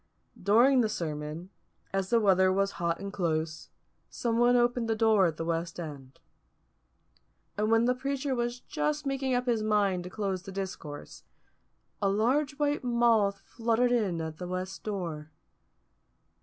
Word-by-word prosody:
During 240 +7 +5
the 220 - +1
sermon, 155 +1 -5 0.4
as 195 -1 -1
the 235 - +4
weather 190 -3 +4
was 195 +1 +1
hot 170 -1 0
and 200 0 -6
close, 160 -4 -2 0.4
someone 240 +1 +2
opened 240 -1 +2
the 225 - +2
door 215 -4 +4
at 160 -2 -4
the 165 - -3
west 165 +1 -2
end. 140 -5 -8 1.4
And 210 +1 0
when 225 +1 +4
the 250 - +3
preacher 270 +1 -2
was 240 0 -2
just 300 0 -2
making 270 -1 0
up 245 0 0
his 235 -3 +1
mind 205 -4 +1
to - - -6
close 195 -2 -2
the 195 +1 -9
discourse, 185 -6 -7 0.8
a 200 - +2
large 265 +8 +1
white 290 -1 0
moth 230 -5 +2
fluttered 235 +1 +1
in 205 -8 +1
at 160 0 -6
the 180 - -5
west 185 +1 -5
door. 170 -7 -4
205 Hz, 155 wpm, -29 LUFS, 180-240 Hz, 1.4 s, During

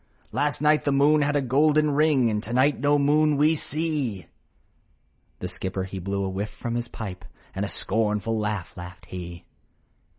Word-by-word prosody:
" - - -36
Last 145 +1 -1
night 150 0 +4
the 145 - +1
moon 145 +2 +4
had 145 0 +1
a 145 - +2
golden 150 +4 +3
ring, 140 -5 +3
And 105 0 -1
to 115 +2 -6
night 130 +3 +3
no 145 +2 +3
moon 150 +1 +3
we 155 +3 +4
see! 150 - -2 0.6
' - - -41
The - - -2
skipper, 95 0 -4
he 95 0 -6
blew 100 +2 -2
a 95 - -1
whiff 100 +3 -3
from 120 - -5
his 120 0 -2
pips, 95 -5 -7 0.3
And - - -3
a - - -5
scornful 105 +2 -1
laugh 105 -4 -3
laughed 90 +1 -10
he. 85 -1 -8
125 Hz, 190 wpm, -25 LUFS, 100-145 Hz, 0.6 s, night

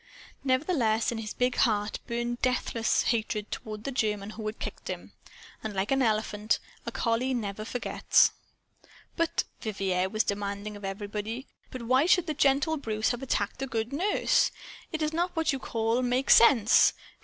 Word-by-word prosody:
Nevertheless, 255 - +1
in 230 - -3
his 215 -1 -6
big 250 0 0
heart 210 -2 +1
burned 240 0 -2
deathless 240 -3 +1
hatred 215 -2 -1
toward 215 -1 -6
the 275 - -3
German 210 -5 -1
who 220 - -8
had 215 - -4
kicked - - -7
him. - - -6 0.5
And, 215 -2 -4
like 195 +4 -1
an 270 0 +3
elephant, 215 -2 +1 0.3
a - - -2
collie 235 +3 0
never 215 -2 -3
forgets. 240 +2 +2 0.8
"But," 335 -1 +1 0.2
Vivier 190 -4 -1
was 215 +2 +1
demanding 200 +1 -3
of 205 - -11
everybody, 210 +5 -4 0.2
"but 255 -2 -7
why 260 +6 +3
should 360 -1 +4
the 310 - -2
gentle 285 +3 +2
Bruce 220 -5 -1
have 245 0 -4
attacked 245 -2 -2
a 270 - -2
good 230 +1 -3
nurse? 380 +8 +2 0.4
It 320 -1 -2
is 305 +1 -1
not 350 +2 -1
what 320 -2 +1
you 270 - -2
call 230 0 0
'make 250 +2 +1
sense.' 235 -3 +6
230 Hz, 165 wpm, -28 LUFS, 215-265 Hz, 0.8 s, sense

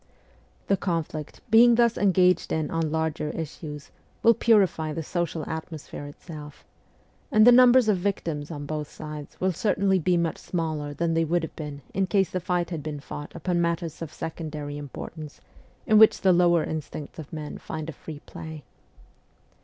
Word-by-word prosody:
The 195 - +2
conflict, 165 -5 -3
being 235 +1 +7
thus 235 -1 +4
engaged 180 -3 +3
in 155 -2 -1
on 165 -2 -1
larger 160 -1 -1
issues, 150 -2 -6 0.3
will 230 - +7
purify 195 -9 +3
the 165 - -3
social 165 -1 -2
atmosphere 160 -2 -6
itself; 150 0 -11 0.7
and 215 -3 +6
the 245 - +9
numbers 250 -1 +7
of 210 -3 +3
victims 165 -6 -2
on 145 -3 -6
both 150 0 -4
sides 150 -1 -9
will 185 0 +2
certainly 195 +1 +1
be 175 +1 +2
much 170 -2 -1
smaller 155 -4 -3
than 165 +1 0
they 165 0 +2
would 170 +1 0
have 160 - -6
been 145 -3 -7
in 190 0 +1
case 195 -1 +2
the 185 - -1
fight 180 0 -1
had 165 -3 -3
been 150 -1 -5
fought 145 +1 -8
upon 175 +1 0
matters 170 -1 -2
of 160 -2 -5
secondary 155 -3 -5
importance 145 +1 -8 0.5
in 215 -1 +5
which 220 - +6
the 190 -1 +5
lower 175 -2 +4
instincts 155 -1 -6
of 150 - -9
men 155 -2 -6
find 155 -1 -6
a 160 - -5
free 150 -1 -9
play. 160 -2 -8
165 Hz, 170 wpm, -26 LUFS, 150-185 Hz, 0.7 s, the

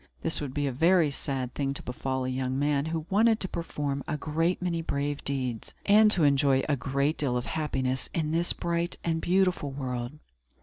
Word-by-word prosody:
This 160 - +1
would 140 -3 -4
be 145 -1 0
a 140 - 0
very 165 +3 +3
sad 130 -2 -3
thing 140 -1 -2
to - - -3
befall 130 +1 -3
a - - -1
young 130 0 -2
man 145 0 +1
who 160 -1 -3
wanted 220 +2 +4
to 190 - 0
perform 145 -5 -3
a 150 - -1
great 165 +4 0
many 175 -2 -1
brave 145 -2 -2
deeds, 130 -5 -3
and 215 +1 +6
to 185 -6 +3
enjoy 140 -2 +4
a 145 - +2
great 140 +3 -1
deal 130 -4 0
of 120 - -3
happiness, 130 -4 -2
in 155 -2 -1
this 170 +2 +1
bright 170 0 -2
and 165 -1 0
beautiful 180 -5 +2
world. 125 -2 -4
145 Hz, 200 wpm, -28 LUFS, 135-165 Hz, -, and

